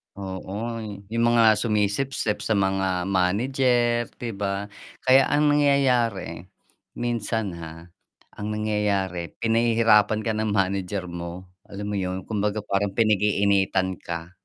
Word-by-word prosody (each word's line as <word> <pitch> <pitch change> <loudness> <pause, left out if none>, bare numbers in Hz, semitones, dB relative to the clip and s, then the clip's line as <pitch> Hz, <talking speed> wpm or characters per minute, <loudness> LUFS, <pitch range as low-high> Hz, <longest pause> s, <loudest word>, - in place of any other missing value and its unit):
Oo, 100 +4 -5 0.3
yung 115 0 +1
mga 115 -3 +5
sumisipsip 105 +1 0
sa 105 +1 0
mga 95 -2 0
manager, 120 +5 +1
'di 120 -2 -5
ba? 100 0 -3 0.4
Kaya 130 +1 +5
ang 145 0 +3
nangyayari, 125 - +2 0.6
minsan 115 -4 -2
ha, 80 +1 -10 0.4
ang 105 - -6
nangyayari, 105 -5 -1
pinahihirapan 115 -2 +3
ka 115 - 0
ng 110 -1 -1
manager 95 0 -1
mo, 85 +1 -7 0.2
alam 100 +1 -6
mo 100 - -1
yun? 95 0 -3
Kumbaga 105 -1 -2
parang 100 0 -1
pinag-iinitan 100 -3 +2
ka 85 +1 -6
105 Hz, 115 wpm, -24 LUFS, 95-115 Hz, 0.6 s, mga